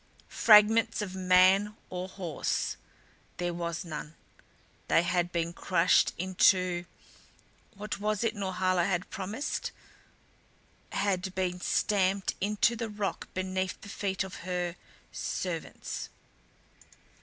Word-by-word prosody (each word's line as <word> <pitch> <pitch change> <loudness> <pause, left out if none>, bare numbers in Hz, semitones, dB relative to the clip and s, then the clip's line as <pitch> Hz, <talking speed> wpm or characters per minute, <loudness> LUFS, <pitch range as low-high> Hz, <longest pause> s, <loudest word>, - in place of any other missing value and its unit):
Fragments 220 +1 +5
of 190 -3 -6
man 190 +3 +4 0.2
or 180 0 -4
horse 180 -5 -2 0.6
there 175 -1 -2
was 170 0 -3
none. 155 -1 -7 0.7
They 165 - +4
had 175 0 0
been 170 0 -1
crushed 170 -1 +3
into 180 -1 +3 0.9
what 210 +1 -5
was 210 +1 0
it 230 - 0
Norhala 185 -2 +1
had 180 -2 -2
promised 210 +10 -3 1.2
had 190 -2 -1
been 180 -1 -1
stamped 195 -1 +1
into 210 +4 +2
the 230 -1 -4
rock 205 -1 -3
beneath 185 0 -2
the 200 - -10
feet 195 -2 -2
of 190 0 -8
her 175 -1 -3 0.4
servants. - - -4
185 Hz, 110 wpm, -29 LUFS, 180-205 Hz, 1.2 s, Fragments